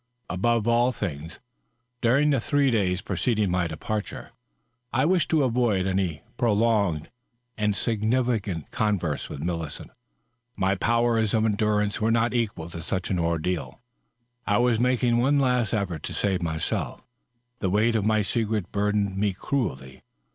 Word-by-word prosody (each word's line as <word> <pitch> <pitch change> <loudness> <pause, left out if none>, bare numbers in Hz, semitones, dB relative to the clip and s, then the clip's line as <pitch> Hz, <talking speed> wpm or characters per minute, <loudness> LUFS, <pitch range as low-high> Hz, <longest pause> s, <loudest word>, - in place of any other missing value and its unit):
Above 115 +5 +1
all 120 +2 +3
things, 80 - -5 0.6
during 140 +5 +3
the 135 - +2
three 140 +3 +2
days 95 -5 +1
preceding 105 -6 0
my 90 -1 +1
departure, 105 +7 -5 0.6
I 130 +2 +2
wished 175 -1 +2
to 155 -3 +3
avoid 115 -6 +1
any 95 -5 -1
prolonged 105 - +1 0.4
and 105 -1 0
significant 110 - -1
converse 95 -9 -1
with - - -6
Millicent. 85 -3 -4 0.6
My 95 +1 +1
powers 115 +1 +1
of 110 0 +2
endurance 105 0 +1
were 110 - +2
not 115 +1 +2
equal 105 -9 -2
to 85 - -6
such 95 +3 -3
an 90 - +1
ordeal. 85 +1 -2 0.7
I 105 - +3
was 120 -2 +2
making 125 -1 +2
one 140 +4 +3
last 125 -5 +2
effort 95 -8 -2
to - - -6
save 95 -3 0
myself; 80 -2 -3 0.6
the 95 - 0
weight 110 +4 +2
of 110 - +1
my 110 0 +2
secret 110 -2 -1
burdened 100 -1 0
me 100 0 0
cruelly. 65 - -3
105 Hz, 145 wpm, -25 LUFS, 90-120 Hz, 0.7 s, all